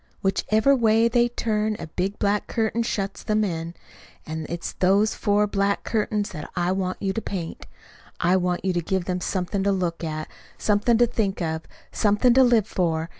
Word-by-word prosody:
Whichever 215 +7 +2
way 225 -2 +4
they 240 +1 +2
turn 215 -2 -1
a - - -6
big 185 +5 -3
black 205 0 0
curtain 225 0 0
shuts 195 -5 -3
them 215 0 +1
in. 165 -3 -3 0.5
And 160 0 -5
it's 170 +1 -4
those 200 +4 +3
four 205 0 +2
black 200 -1 0
curtains 210 -2 -1
that 155 -5 -7
I 175 0 +1
want 185 -1 -2
you 195 -1 0
to 225 - -2
paint. 180 -6 -6 0.5
I 175 +2 +3
want 180 0 0
you 190 - +1
to 175 - 0
give 185 +1 -1
them 180 0 -2
something 190 +2 -2
to 200 +1 +2
look 175 -3 -2
at, 155 -1 -3 0.3
something 215 +3 +2
to 240 - +5
think 220 -5 -1
of, 160 -2 -2 0.3
something 210 +3 +3
to 265 +1 +6
live 235 -5 +4
for. 165 -5 -1
195 Hz, 185 wpm, -24 LUFS, 180-215 Hz, 0.5 s, to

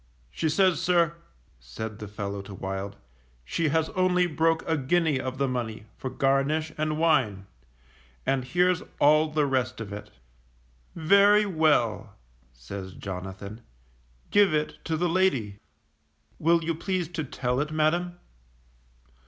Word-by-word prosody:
She 160 - -1
says, 185 +3 +3
sir, 170 -2 +3 0.5
said 105 - -7
the 105 - -6
fellow 100 -1 -5
to 100 0 -10
Wild 95 +1 -5 0.5
she 155 - 0
has 160 +1 +1
only 180 -1 +2
broke 165 0 +1
a 160 - +2
guinea 155 0 +1
of 130 0 -4
the 140 0 +1
money 115 -4 -4
for 130 - -5
garnish 135 +4 +1
and 155 0 -1
wine, 130 -12 +2 0.8
and 135 -1 +1
here's 180 +6 +2 0.2
all 155 +2 +5
the 150 -1 +1
rest 130 -3 -1
of 105 -3 -6
it. 105 0 -8 0.9
Very 200 +5 +5
well, 155 - +1 0.4
says 95 +11 -8
Jonathan, 95 +3 -7 0.7
_give 205 -5 +5
it 150 0 -1
to 160 -1 -1
the 175 +2 +1
lady. 140 - +1 0.8
Will 165 +1 +3
you 165 +1 0
please 180 +1 -2
to 165 -2 -3
tell 125 -2 -2
it, 150 +1 -1
madam? 170 +3 0
150 Hz, 135 wpm, -27 LUFS, 110-165 Hz, 0.9 s, all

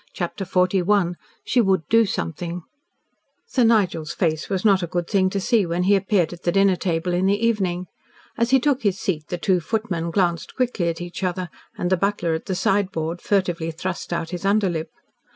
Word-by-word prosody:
CHAPTER 180 +2 -4
XLI 185 0 +2 0.3
SHE 250 - +3
WOULD 190 -7 +1
DO 225 -1 +4
SOMETHING 170 - -4 0.8
Sir 275 - +1
Nigel's 200 -9 +2
face 160 -3 -1
was 190 0 -2
not 195 -3 +5
a 175 - -2
good 175 0 -2
thing 190 -3 +2
to 195 - -2
see 215 +2 +2
when 175 0 -1
he 200 +2 +4
appeared 195 -4 +1
at 175 - -11
the 175 - +1
dinner 195 0 +4
table 175 0 -1
in 180 +2 +2
the 200 +1 +3
evening. 185 -6 0 0.5
As 235 0 +1
he 265 +1 +5
took 275 0 +1
his 200 -3 0
seat 155 -5 -2
the 175 - -3
two 180 +1 +2
footmen 175 -3 -2
glanced 170 -3 0
quickly 235 -9 0
at 165 +1 -4
each 175 +2 -6
other, 185 -1 -2 0.3
and 180 +1 -2
the 185 - +4
butler 195 -3 0
at 160 - -4
the 190 - -1
sideboard 180 -4 0
furtively 175 -5 0
thrust 175 +3 -5
out 170 -1 -2
his 180 0 -5
underlip. 195 -5 +1
185 Hz, 195 wpm, -23 LUFS, 170-200 Hz, 0.8 s, not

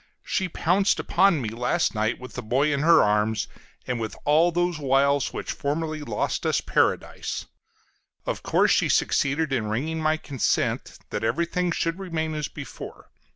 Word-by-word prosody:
She 190 -2 -1
pounced 190 +5 +2
upon 190 -8 +3
me 110 - -2
last 125 +9 0
night 110 +1 0
with 125 -1 -10
the - - -5
boy 135 +6 +1
in 140 - 0
her 165 +3 +6
arms, 105 +1 +1 0.4
and 125 -2 -2
with 110 -1 -4
all 160 +4 +4
those 175 -1 0
wiles 140 0 +2
which - - -4
formerly 155 +2 -2
lost 115 -8 -2
us - - +2
Paradise; - - -1 0.8
of - - -3
course - - +3
she - - +3
succeeded 145 +1 +1
in 115 -5 0
wringing 155 +10 -2
my 155 0 +2
consent 140 -6 -1
that 105 - -3
everything 170 +9 0
should 165 +2 -1
remain 160 -4 -3
as 150 -1 -2
before. - - -10
150 Hz, 160 wpm, -25 LUFS, 125-165 Hz, 0.8 s, her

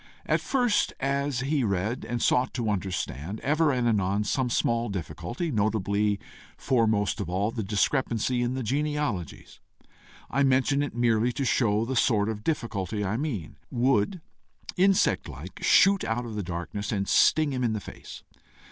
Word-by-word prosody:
At - - +1
first, 245 -6 +1
as 140 -1 -1
he 140 0 0
read 105 +4 -1
and 120 0 -2
sought 125 +1 +2
to 115 -4 0
understand, 95 - -3
ever 150 +2 +2
and 125 -2 0
anon 100 -2 +1
some 130 +3 0
small 115 0 0
difficulty, 100 - -4
notably, 105 -2 0 0.4
foremost 110 -4 +1
of 90 - -4
all, 100 +4 0
the 115 - -4
discrepancy 115 +3 0
in 120 +1 -1
the 130 - -3
genealogies 140 - -3 0.7
I 140 - 0
mention 135 +1 +3
it 145 -5 -3
merely 120 0 +2
to 135 - -2
show 115 -3 +2
the 130 +2 -3
sort 110 -4 +2
of 105 -1 -5
difficulty 105 - -2
I 95 +3 -1
mean 115 - -4
would 130 - +1 0.5
insect 190 +1 +2
like - - -9
shoot 195 0 +5
out 120 +2 -2
of 115 - -6
the 105 - -2
darkness, 90 +3 -4
and 100 -3 -1
sting 155 -3 +4
him 125 -1 -1
in 115 -2 +1
the 110 - -2
face. - - -11
115 Hz, 160 wpm, -27 LUFS, 105-135 Hz, 0.7 s, shoot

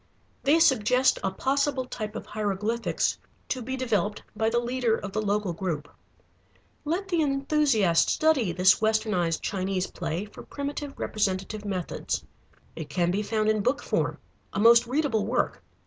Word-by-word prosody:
They 285 +4 +4
suggest 255 -4 +4
a 195 - +1
possible 270 +5 0
type 215 -4 -6
of - - -5
hieroglyphics 210 +2 -1 0.3
to 255 - -2
be 260 +3 -4
developed 215 -5 -1
by 220 +1 +1
the 235 - 0
leader 240 -1 +1
of 200 - -6
the 215 - 0
local 205 -3 0
group. 165 -4 -3 1.0
Let 345 +6 -2
the 345 -3 +1
enthusiast 275 - +2
study 290 - +2
this 185 +3 +4
westernized 215 -7 +1
Chinese 190 -1 -1
play 175 +3 -4
for 210 - -12
primitive 285 0 -5
representative 205 0 -2
methods. 185 -4 -3 0.5
It 160 -3 -7
can 175 -1 +1
be 200 +3 0
found 215 0 0
in 215 -1 +2
book 255 +7 0
form, - - 0 0.4
a - - -2
most 235 +2 +6
readable 255 -5 +1
work. 245 +2 0
220 Hz, 150 wpm, -27 LUFS, 195-265 Hz, 1.0 s, most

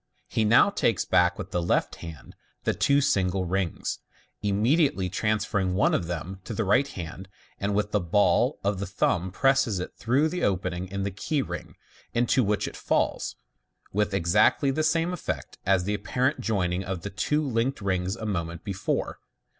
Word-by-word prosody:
He 110 - 0
now 120 - +6
takes 115 - +1
back 90 -1 +3
with - - -7
the 90 - 0
left 85 - 0
hand 80 -3 -10 0.3
the - - +1
two 140 0 +3
single 95 -8 +1
rings, 90 -1 -2 0.4
immediately 105 - +2
transferring 100 -2 0
one 100 - +3
of 85 - 0
them 90 +2 -5
to - - -5
the 110 - 0
right 125 +8 +3
hand, 90 -2 -7 0.3
and 100 0 -1
with 105 0 0
the 105 - +2
ball 100 - +2
of 100 -1 0
the 100 - -3
thumb 95 -1 0
presses 125 -2 +2
it 90 - -5
through 130 +6 +2
the 180 +3 -3
opening 95 -2 -1
in 100 +1 -3
the 100 - -2
key 135 - -1
ring, - - -7 0.4
into 120 +2 +3
which 105 0 0
it - - -7
falls, - - 0 0.6
with 105 +1 +1
exactly 95 - +3
the 155 - 0
same 165 +3 +1
effect 180 - -5
as 95 -2 +3
the 105 +3 -1
apparent 130 +6 0
joining 95 -5 0
of 90 -2 -4
the 100 - -5
two 150 +9 0
linked 125 +2 0
rings 95 -1 -1
a 110 - -6
moment 85 -4 -3
before. 100 -2 -2
100 Hz, 180 wpm, -26 LUFS, 90-120 Hz, 0.6 s, now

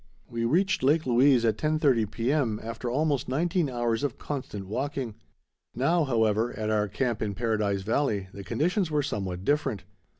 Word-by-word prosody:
We 115 -1 -2
reached 190 +8 +2
Lake 150 +4 +3
Louise 125 0 +4
at 110 -2 +1
10.30 145 -8 +2
P.M., 120 -1 0
after 115 +2 -4
almost 145 0 0
nineteen 165 +3 +1
hours 120 -2 -1
of 145 -4 -2
constant 125 -9 -5
walking. 130 +2 -3 0.6
Now, 160 +6 +2
however, 115 -2 +1
at 110 -1 -1
our 105 -1 +2
camp 120 +2 -2
in 105 -2 -2
Paradise 105 -3 0
Valley, 110 -3 0
the 100 - -8
conditions 175 - 0
were 150 -2 +1
somewhat 95 -8 -3
different. 145 - 0
120 Hz, 160 wpm, -27 LUFS, 110-145 Hz, 0.6 s, Louise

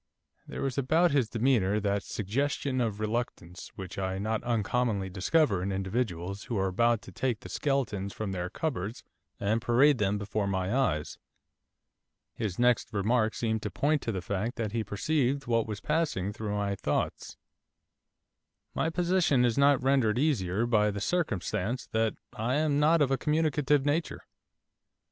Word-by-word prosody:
There - - -5
was 135 0 -1
about 160 +6 +3
his 135 -6 +2
demeanour 110 -4 +2
that 100 -1 0
suggestion 130 +6 -1
of 110 -3 -1
reluctance 110 -6 -3
which 95 0 -7
I 95 0 -2
not 110 +3 -1
uncommonly 115 -3 0
discover 100 - +2
in 95 +2 -2
individuals 95 -1 -2
who 120 -5 -3
are 95 0 +1
about 115 +3 +2
to - - -11
take 120 +3 -2
the - - -10
skeletons 115 -9 -1
from 105 -1 -4
their 90 -1 -3
cupboards 115 - -3 0.4
and 110 +3 0
parade 130 +4 +4
them 100 0 +1
before 100 0 -2
my 95 +3 -1
eyes. 75 - 0 1.1
His 100 -5 -3
next 120 -1 +2
remark 110 +2 +1
seemed 110 -2 -1
to 105 - -3
point 145 +7 +1
to 115 - -2
the 95 -4 -4
fact 100 +6 -2
that 110 -4 -3
he 115 0 -1
perceived 135 +7 0
what 115 -2 +1
was 105 -2 -4
passing 150 - -1
through 105 -1 -4
my 100 -1 -1
thoughts. 100 - -2 1.4
'My 160 - 0
position 175 -6 +2
is 120 -2 +1
not 140 -2 +4
rendered 130 -5 +3
easier 115 - +1
by 105 -3 +3
the 100 0 -3
circumstance 110 - -1
that 110 0 +1 0.2
I 120 +4 -1
am 150 -1 +2
not 155 +1 +4
of 135 - 0
a 135 - +1
communicative 150 -2 +1
nature. 155 +3 -1
115 Hz, 160 wpm, -29 LUFS, 100-135 Hz, 1.4 s, parade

